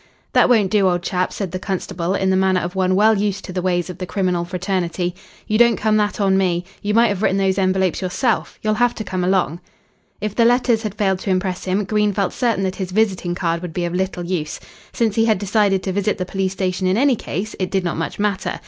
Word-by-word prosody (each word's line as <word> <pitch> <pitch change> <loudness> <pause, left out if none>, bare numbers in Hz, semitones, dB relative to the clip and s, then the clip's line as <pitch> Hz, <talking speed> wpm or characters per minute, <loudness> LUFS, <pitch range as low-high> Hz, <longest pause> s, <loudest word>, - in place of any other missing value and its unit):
"That - - +5
won't 215 -6 +3
do, 200 -3 +4
old 175 -1 -1
chap," 180 0 -1
said 195 -4 -4
the 185 - -4
constable, 185 -1 -2
in 190 -1 +1
the - - +3
manner 190 -1 +2
of 175 +1 -4
one 185 -1 +1
well 215 +3 +5
used 200 -1 -1
to 185 - -7
the 180 - -1
ways 175 -1 0
of 180 -1 -8
the 185 - -4
criminal 180 -2 0
fraternity. 180 -1 -2 0.3
"You 215 0 0
don't 235 -1 +6
come 215 0 +1
that 210 0 0
on 195 -1 +3
me. 175 -2 0 0.2
You 210 +1 -1
might 235 +1 +5
have 200 -1 -2
written 195 -3 +2
those 195 0 +1
envelopes 190 -2 +1
yourself. 210 +6 -1
You'll 215 0 +2
have 245 0 +3
to 220 - -4
come 185 -3 -3
along." 180 -2 +1 0.6
If 210 0 -3
the 235 - +3
letters 240 -1 +3
had 210 -3 -4
failed 190 -3 +1
to 200 - -5
impress 185 -1 -1
him, 190 +2 0
Green 210 +1 +1
felt 195 -1 -1
certain 230 -6 0
that 190 -1 -2
his 190 -2 -3
visiting 190 -3 0
card 170 -1 -1
would 175 -3 -6
be 175 -1 -1
of 170 - -3
little 185 -1 -2
use. 170 -4 -3 0.3
Since 225 -3 0
he 225 - +4
had 220 -2 +3
decided 200 -1 +1
to 190 - -2
visit 205 +1 0
the 185 - -3
police 190 0 -2
station 185 -1 -1
in 185 +2 +2
any 270 +1 +4
case, 215 -1 -5
it 185 -1 -1
did 190 -1 0
not 170 - -2
much 165 - -4
matter. 205 -2 -1
190 Hz, 245 wpm, -20 LUFS, 185-210 Hz, 0.6 s, don't